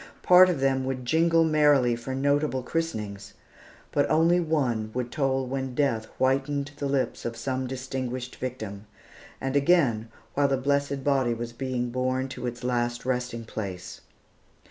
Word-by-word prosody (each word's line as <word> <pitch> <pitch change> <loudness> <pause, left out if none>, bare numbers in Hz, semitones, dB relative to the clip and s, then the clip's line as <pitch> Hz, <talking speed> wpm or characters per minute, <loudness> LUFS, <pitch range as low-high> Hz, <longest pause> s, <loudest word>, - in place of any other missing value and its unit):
Part 185 +1 +8
of 165 -7 -1
them 135 -1 +2
would 130 -1 -3
jingle 165 +4 +3
merrily 145 -6 +4
for 120 +3 -5
notable 140 -1 +1
christenings; 110 -11 -4 0.6
but 145 - +1
one 155 - +3
only 170 +2 +4
would 125 -7 -1
toll 135 -2 0
when 130 0 -4
death 115 -6 +1
whitened 140 +2 0
the 145 - -2
lips 135 -1 -1
of 115 0 -4
some 130 +2 -2
distinguished 130 -1 -4
victim; 110 -5 -6 0.5
and 135 +1 -3
again, 140 -8 +3 0.2
while 145 0 +3
the 135 -1 +1
blessed 140 0 0
body 130 -4 +2
was 120 0 -6
being 125 -1 -2
borne 130 +1 -1
to 125 - -5
its 120 0 -6
last 120 -1 -1
resting 125 -2 -2
place. 95 -5 -6
130 Hz, 150 wpm, -26 LUFS, 120-140 Hz, 0.6 s, Part